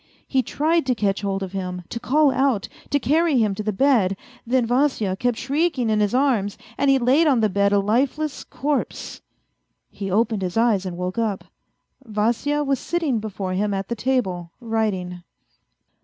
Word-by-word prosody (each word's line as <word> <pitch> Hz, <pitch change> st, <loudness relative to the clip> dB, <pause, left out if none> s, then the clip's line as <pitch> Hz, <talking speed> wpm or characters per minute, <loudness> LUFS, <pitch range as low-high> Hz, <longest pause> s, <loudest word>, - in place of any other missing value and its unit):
He 265 Hz, -, +2 dB
tried 310 Hz, +3 st, 0 dB
to 250 Hz, -, +2 dB
catch 205 Hz, -2 st, 0 dB
hold 195 Hz, -1 st, -2 dB
of 190 Hz, -, -6 dB
him, 180 Hz, -2 st, -4 dB
to 230 Hz, -, -4 dB
call 280 Hz, +4 st, +3 dB
out, 260 Hz, -6 st, +1 dB, 0.2 s
to 285 Hz, -, +2 dB
carry 315 Hz, +3 st, +2 dB
lu'm 215 Hz, -5 st, +2 dB
to 215 Hz, -, -4 dB
the 215 Hz, 0 st, -1 dB
bed. 205 Hz, -4 st, +2 dB, 0.3 s
Then 250 Hz, 0 st, +2 dB
Vasya 245 Hz, -6 st, +1 dB
kept 245 Hz, +1 st, 0 dB
shrieking 275 Hz, -4 st, 0 dB
in 215 Hz, -, +2 dB
his 210 Hz, +2 st, +1 dB
arms, 240 Hz, -7 st, +1 dB, 0.2 s
and 280 Hz, -, +1 dB
he 270 Hz, -, +5 dB
laid 265 Hz, +6 st, +3 dB
on 260 Hz, -6 st, +3 dB
the 215 Hz, -, +3 dB
bed 200 Hz, +1 st, +2 dB
a 205 Hz, -, +4 dB
lifeless 265 Hz, +9 st, 0 dB
corpse. 290 Hz, 0 st, -3 dB, 0.7 s
He 195 Hz, -1 st, -5 dB
opened 220 Hz, +1 st, +1 dB
his 180 Hz, +2 st, -3 dB
eyes 220 Hz, -5 st, +2 dB
and 175 Hz, -1 st, -5 dB
woke 180 Hz, +4 st, -3 dB
up; 215 Hz, -4 st, -1 dB, 0.6 s
Vasya 235 Hz, +6 st, 0 dB
was 275 Hz, -2 st, 0 dB
sitting 320 Hz, -9 st, -1 dB
before 195 Hz, -3 st, -4 dB
him 200 Hz, +2 st, 0 dB
at 195 Hz, 0 st, -4 dB
the 235 Hz, -, -1 dB
table, 210 Hz, -8 st, -1 dB
writing. 210 Hz, -7 st, -2 dB
225 Hz, 180 wpm, -22 LUFS, 195-270 Hz, 0.7 s, he